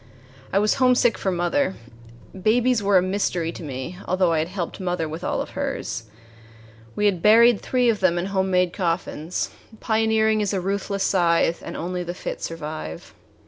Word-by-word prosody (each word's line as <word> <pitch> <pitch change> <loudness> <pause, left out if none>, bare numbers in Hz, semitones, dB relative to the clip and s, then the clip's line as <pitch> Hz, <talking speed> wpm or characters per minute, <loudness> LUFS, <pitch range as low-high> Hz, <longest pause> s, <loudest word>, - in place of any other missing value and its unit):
I - - +1
was 210 +6 +2
homesick 250 -2 +4
for 195 - -2
mother. 185 +7 0 0.6
Babies 230 +5 +2
were 200 -1 +4
a 180 - +4
mystery 185 -3 -1
to - - -10
me, 145 +4 -6
although 185 -2 +2
I 160 - +2
had 155 - -1
helped 180 -2 -5
mother 180 -3 -2
with 160 +3 -7
all - - -1
of - - -6
hers. 115 - -4 0.9
We 210 - 0
had 190 -5 +2
buried 225 +2 +6
three 250 -1 +1
of 225 -3 +2
them 185 -2 +2
in 175 - -1
homemade 190 -2 +1
coffins 170 -2 -2 0.3
pioneering 220 -1 +2
is 205 -1 -1
a - - 0
ruthless 195 +1 -2
scythe, 170 -3 +2
and - - -6
only 180 +1 -3
the 175 +1 -5
fit - - -6
survive. 115 - -6
185 Hz, 175 wpm, -23 LUFS, 170-210 Hz, 0.9 s, buried